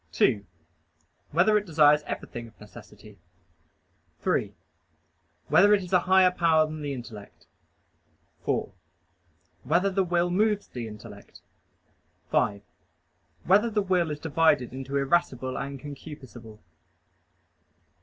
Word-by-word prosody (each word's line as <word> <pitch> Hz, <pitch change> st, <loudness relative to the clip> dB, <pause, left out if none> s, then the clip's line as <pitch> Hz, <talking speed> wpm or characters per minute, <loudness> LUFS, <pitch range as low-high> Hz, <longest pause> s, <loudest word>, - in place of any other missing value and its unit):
(2) 100 Hz, -2 st, +2 dB, 0.9 s
Whether 200 Hz, +7 st, +3 dB
it 205 Hz, -, -10 dB
desires 150 Hz, -2 st, +4 dB
everything 120 Hz, -1 st, -6 dB
of 110 Hz, -, -20 dB
necessity? 105 Hz, -1 st, -15 dB, 1.0 s
(3) -, -, -1 dB, 0.9 s
Whether 205 Hz, +2 st, +5 dB
it 195 Hz, -, -3 dB
is 180 Hz, +1 st, -9 dB
a 180 Hz, -, +6 dB
higher 190 Hz, -1 st, +6 dB
power 165 Hz, -3 st, +3 dB
than 155 Hz, 0 st, -7 dB
the 145 Hz, -1 st, -4 dB
intellect? 120 Hz, -6 st, -10 dB, 1.0 s
(4) -, -, -2 dB, 0.9 s
Whether 195 Hz, +3 st, +1 dB
the 190 Hz, 0 st, +1 dB
will 175 Hz, 0 st, 0 dB
moves 210 Hz, +2 st, +1 dB
the 120 Hz, -2 st, -7 dB
intellect? 105 Hz, -1 st, -12 dB, 0.9 s
(5) 100 Hz, -1 st, 0 dB, 0.8 s
Whether 205 Hz, +6 st, +3 dB
the 210 Hz, -2 st, 0 dB
will 180 Hz, -3 st, +1 dB
is 150 Hz, -1 st, -5 dB
divided 155 Hz, -5 st, +1 dB
into 135 Hz, +1 st, -4 dB
irascible 135 Hz, -3 st, 0 dB
and 140 Hz, 0 st, -5 dB
concupiscible? 130 Hz, -6 st, -11 dB
150 Hz, 115 wpm, -26 LUFS, 125-180 Hz, 1.0 s, a